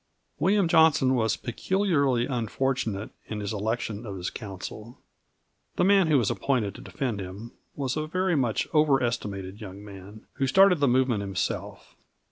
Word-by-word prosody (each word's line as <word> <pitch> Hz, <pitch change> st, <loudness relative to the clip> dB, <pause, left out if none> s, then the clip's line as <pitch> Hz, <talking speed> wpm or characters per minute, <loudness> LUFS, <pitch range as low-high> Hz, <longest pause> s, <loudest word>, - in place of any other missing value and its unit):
William 195 Hz, 0 st, +3 dB
Johnson 160 Hz, -6 st, +4 dB
was 115 Hz, -3 st, +1 dB
peculiarly 140 Hz, -, 0 dB
unfortunate 120 Hz, -4 st, -2 dB, 0.2 s
in 110 Hz, -, -5 dB
the 105 Hz, -, -4 dB
election 110 Hz, +1 st, -2 dB
of 100 Hz, -4 st, -6 dB
his 90 Hz, 0 st, -4 dB
counsel. 105 Hz, +3 st, -8 dB, 0.8 s
The -, -, +1 dB
man 195 Hz, -2 st, +5 dB
who 155 Hz, -2 st, +4 dB
was 120 Hz, -6 st, +1 dB
appointed 120 Hz, -8 st, 0 dB
to -, -, -11 dB
defend 125 Hz, -8 st, -3 dB
him 100 Hz, +5 st, -8 dB, 0.2 s
was 135 Hz, -3 st, -2 dB
a 155 Hz, 0 st, -2 dB
very 185 Hz, +1 st, 0 dB
much 125 Hz, -6 st, 0 dB
overestimated 115 Hz, -, 0 dB
young 100 Hz, 0 st, -9 dB
man 100 Hz, +1 st, -12 dB
who 135 Hz, -, +1 dB
started 190 Hz, +4 st, +5 dB
the 140 Hz, -, +3 dB
movement 125 Hz, -3 st, +2 dB
himself. 95 Hz, -3 st, -4 dB
120 Hz, 150 wpm, -26 LUFS, 105-145 Hz, 0.8 s, man